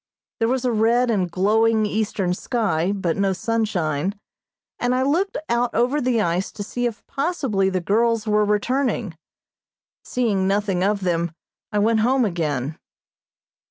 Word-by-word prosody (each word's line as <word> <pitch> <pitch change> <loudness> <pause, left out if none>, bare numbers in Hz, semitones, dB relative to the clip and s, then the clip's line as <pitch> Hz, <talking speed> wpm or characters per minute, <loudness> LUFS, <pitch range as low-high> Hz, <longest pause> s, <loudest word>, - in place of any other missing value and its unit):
There 225 - +2
was 255 +1 0
a 250 - +2
red 235 +2 +2
and 190 -5 0
glowing, 215 +5 +2
eastern 205 -3 -1
sky, 195 -5 0
but 190 -4 -1
no 195 -1 +1
sunshine, 190 -6 -1 0.6
and 245 +1 +1
I 260 - +1
looked 350 +8 0
out 235 +1 +1
over 260 +5 +2
the 245 -2 +1
ice 175 0 -1
to 205 - -5
see 245 +4 -2
if 225 -3 -7
possibly 270 - 0
the 185 -1 -1
girls 230 +4 +1
were 210 -1 +3
returning. 210 - 0 0.9
Seeing 210 -6 0
nothing 195 -2 0
of 200 0 +1
them, 170 -2 -1 0.4
I 210 - -1
went 220 +2 +3
home 250 +3 +3
again. 155 - -2
210 Hz, 150 wpm, -22 LUFS, 190-240 Hz, 0.9 s, were